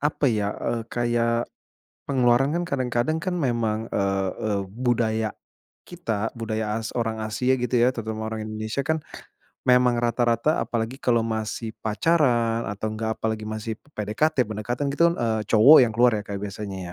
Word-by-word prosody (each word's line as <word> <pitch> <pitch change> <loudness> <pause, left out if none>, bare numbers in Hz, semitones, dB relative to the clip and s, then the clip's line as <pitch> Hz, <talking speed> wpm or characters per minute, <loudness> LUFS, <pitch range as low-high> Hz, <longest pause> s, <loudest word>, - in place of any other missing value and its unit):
apa 150 0 0
ya, 105 -4 0
eee, 115 -1 -2
kayak 120 0 0 0.6
pengeluaran 130 +2 +3
kan 175 - 0
kadang-kadang 130 -1 -1
kan 180 +2 -2
memang, 115 -7 -1
eee 95 -1 0
eee, 105 -2 0
budaya 110 -2 0 0.5
kita, 115 - -3
budaya 110 -1 -2
as 110 0 -6
orang 115 -2 -1
Asia 115 +4 0
gitu 125 0 -1
ya 120 +2 +4
terutama 110 -1 -4
orang 110 -1 -4
Indonesia 110 +4 -3
kan 160 +3 0 0.7
memang 125 -1 +5
rata-rata 120 +5 +1
apalagi 115 +2 -3
kalau 120 -4 +2
masih 110 0 -3
pacaran 115 -2 +2
atau 105 +2 -3
enggak 110 +1 -2
apalagi 110 -1 -2
masih 110 0 -4 0.2
PDKT, 125 +8 +1
pendekatan 120 +6 -3
gitu 170 +4 +4
kan, - - -6
eee, 110 -2 0
cowok 120 +8 +8
yang 115 - -2
keluar 120 +1 +5
ya 105 - -3
Kak 100 -1 -5
biasanya 100 -1 -5
115 Hz, 155 wpm, -24 LUFS, 110-125 Hz, 0.7 s, cowok